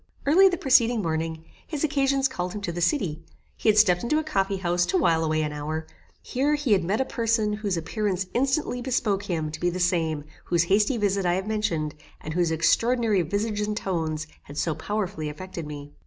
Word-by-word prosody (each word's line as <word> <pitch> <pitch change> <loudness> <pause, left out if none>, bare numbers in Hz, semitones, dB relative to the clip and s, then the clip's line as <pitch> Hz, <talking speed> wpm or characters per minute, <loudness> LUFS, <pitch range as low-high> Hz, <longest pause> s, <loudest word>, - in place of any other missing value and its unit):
Early 370 +7 +6
the 355 - -2
preceding 240 -6 +3
morning, 160 -1 -2 0.2
his 300 -3 -3
occasions 275 -2 +2
called 180 -9 -4
him 210 - -5
to 180 - -3
the 175 +1 -4
city; 170 - 0 0.3
he - - +1
had 215 - +4
stepped 180 -4 +5
into 270 +6 +1
a 315 - 0
coffee 195 -9 0
house 175 -1 +1
to 380 - +1
while 165 - +3
away 155 0 +1
an 150 -1 -3
hour; 155 +2 -4 0.4
here 285 +4 +1
he 290 -5 -2
had 190 -3 +4
met 195 +6 0
a 265 - +1
person 230 -3 0
whose 210 -4 -2
appearance 190 +2 -1
instantly 265 -1 0
bespoke 215 -6 0
him 160 -3 -1
to 160 - -7
be 175 - +1
the 180 +1 -4
same 165 -4 +1 0.2
whose 170 -1 +2
hasty 205 +7 +2
visit 200 -2 +1
I 175 -1 +2
have 190 +1 -2
mentioned, 170 -9 -1 0.3
and 155 - -6
whose 175 0 +1
extraordinary 220 +6 +2
visage 205 +5 -1
and 210 0 -2
tones 160 -6 -2 0.2
had 145 - -10
so 160 - 0
powerfully 190 -5 -3
affected 170 0 -7
me. 145 -1 -8
195 Hz, 205 wpm, -25 LUFS, 165-230 Hz, 0.4 s, Early